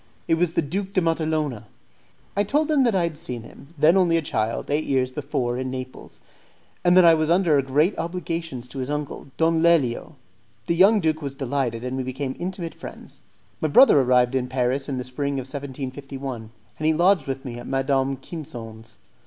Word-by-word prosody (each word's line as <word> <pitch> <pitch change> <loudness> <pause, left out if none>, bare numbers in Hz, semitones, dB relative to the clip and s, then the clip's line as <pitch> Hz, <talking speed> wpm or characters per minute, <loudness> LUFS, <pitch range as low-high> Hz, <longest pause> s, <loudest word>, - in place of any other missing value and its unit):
It - - +2
was 165 0 +1
the 170 - +1
Duke 190 +6 -4
de 190 - +3
Matalona. 155 -8 -1 0.7
I 200 - +2
told 295 +9 +1
him 295 -3 +4
that 230 -4 +2
I 180 - +2
had 165 -3 -3
seen 120 -6 -5
him, 140 - -14
then 155 +5 +5
only 175 -3 +4
a 165 - -1
child, 110 -1 -2
eight 150 +2 +1
years 130 -2 +1
before 130 -3 -2
in 130 0 -3
Naples, 130 0 -8 0.6
and 180 0 +5
that 185 - +8
I 165 - +8
was 155 -1 +1
under 170 -5 +4
great 145 +8 +1
obligations 165 -7 -4
to 135 - -7
his 130 +1 -3
uncle, 150 -1 -4
Don 165 0 +2
Lelio. 160 -8 +2 0.5
The 170 - 0
young 200 +4 +5
duke 160 -1 0
was 140 -2 -5
delighted, 130 -4 -2
and 125 +1 -3
we - - -1
became 130 +1 -4
intimate 175 -2 -4
friends. - - -11 0.4
My - - +2
brother 145 - +7
arrived 125 0 +3
in 130 -1 0
Paris 130 +2 -1
in 135 - -2
the 125 - -3
spring 140 +3 -3
of 135 -2 -3
1751, 135 -3 -6 0.3
and 155 - 0
he 160 - +3
lodged 175 -1 +3
with 135 +1 -4
me 120 -2 -6
at - - -9
Madame 135 0 0
Quinson's. 115 -7 -9
140 Hz, 195 wpm, -24 LUFS, 130-165 Hz, 0.7 s, that